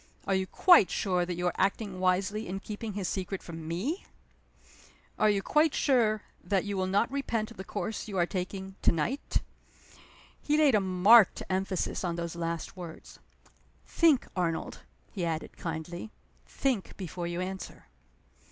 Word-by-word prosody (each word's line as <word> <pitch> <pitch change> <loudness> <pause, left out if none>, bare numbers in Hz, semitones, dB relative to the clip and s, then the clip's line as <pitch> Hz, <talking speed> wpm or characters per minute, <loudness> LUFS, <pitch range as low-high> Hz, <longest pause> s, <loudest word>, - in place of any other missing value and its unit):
Are 195 - +1
you 190 0 +1
quite 350 - +6
sure 180 -3 0
that 180 - -2
you 175 +1 -3
are 180 - +1
acting 195 -1 0
wisely 185 +4 +1
in 190 +2 -3
keeping 210 +1 -6
his 195 -2 -2
secret 190 0 -3
from 165 -2 -8
me? 215 - -3 1.1
Are 215 - +5
you 200 -2 +1
quite 305 +4 +3
sure 220 -6 +2 0.2
that 195 +2 0
you 205 -1 -2
will 190 -1 0
not 200 +6 +1
repent 235 -5 -2
the 190 - -7
course 215 +3 -4
you 200 -3 -4
are 175 - +4
taking 190 +1 -4
to - - +4
night?" 235 - -1 1.0
He 300 +1 +1
laid 300 -4 +5
a 210 - +4
marked 190 +3 +6
emphasis 190 0 -1
on 175 -2 -1
those 170 0 -4
last 170 0 -3
words. 175 -3 -10 0.7
"Think, 320 -6 +3
Arnold," 170 -3 -2 0.3
he 190 - -4
added, 165 -2 -3
kindly. 170 +4 -5 0.4
"Think 255 -8 -1
before 175 -2 -5
you 175 0 -3
answer." 190 - -6
190 Hz, 160 wpm, -29 LUFS, 175-215 Hz, 1.1 s, quite